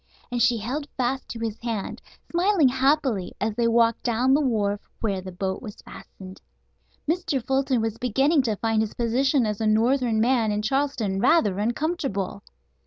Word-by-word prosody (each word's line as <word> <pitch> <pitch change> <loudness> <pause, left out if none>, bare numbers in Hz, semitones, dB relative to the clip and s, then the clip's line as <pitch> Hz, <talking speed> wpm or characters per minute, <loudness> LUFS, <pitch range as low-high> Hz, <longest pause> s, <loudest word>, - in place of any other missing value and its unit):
And 245 -1 -1
she 235 +1 +4
held 270 +7 -4
fast 260 +1 -1
to - - -6
his 225 -1 -4
hand, 230 -4 -4 0.3
smiling 345 -4 +3
happily, 265 -6 +1
as 215 +1 -1
they 235 +2 +1
walked 230 0 +3
down 245 +2 +2
the 290 - +4
wharf 210 -6 0 0.2
where 200 -4 -1
the 185 0 -8
boat 190 +1 -3
was 210 -4 -8
fastened. 185 0 -12 0.7
Mr. 335 -3 0
Fulton 265 -2 +1
was 225 0 -3
beginning 270 +6 +2
to 225 -4 -1
find 225 +1 0
his 220 - -3
position 255 +3 +1
as 210 0 -3
a 220 - +1
northern 230 +1 +2
man 230 -2 +2
in 210 0 -1
Charleston 240 -6 0
rather 210 - +3
uncomfortable. 230 - -2
235 Hz, 170 wpm, -25 LUFS, 215-270 Hz, 0.7 s, she